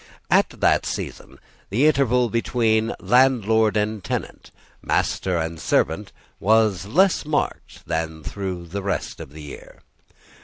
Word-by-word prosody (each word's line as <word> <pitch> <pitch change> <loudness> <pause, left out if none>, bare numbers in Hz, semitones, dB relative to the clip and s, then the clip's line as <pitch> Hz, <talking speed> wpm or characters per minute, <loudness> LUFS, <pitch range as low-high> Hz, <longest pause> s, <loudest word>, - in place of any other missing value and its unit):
At - - +4
that - - +3
season, 70 - -6 0.3
the 120 +9 +2
interval 125 -5 +3
between 115 -1 +1
landlord 110 -2 +3
and 105 -1 -1
tenant, - - -5 0.3
master 90 -2 0
and 80 0 -3
servant, 80 +6 0 0.3
was 105 -3 +2
less 185 - +3
marked 150 -1 -3
than 80 -1 -3
through 95 -1 -5
the 95 +4 -5
rest 100 0 -3
of - - -9
the 75 +1 -10
year. 75 - -12
105 Hz, 125 wpm, -23 LUFS, 85-120 Hz, 0.3 s, At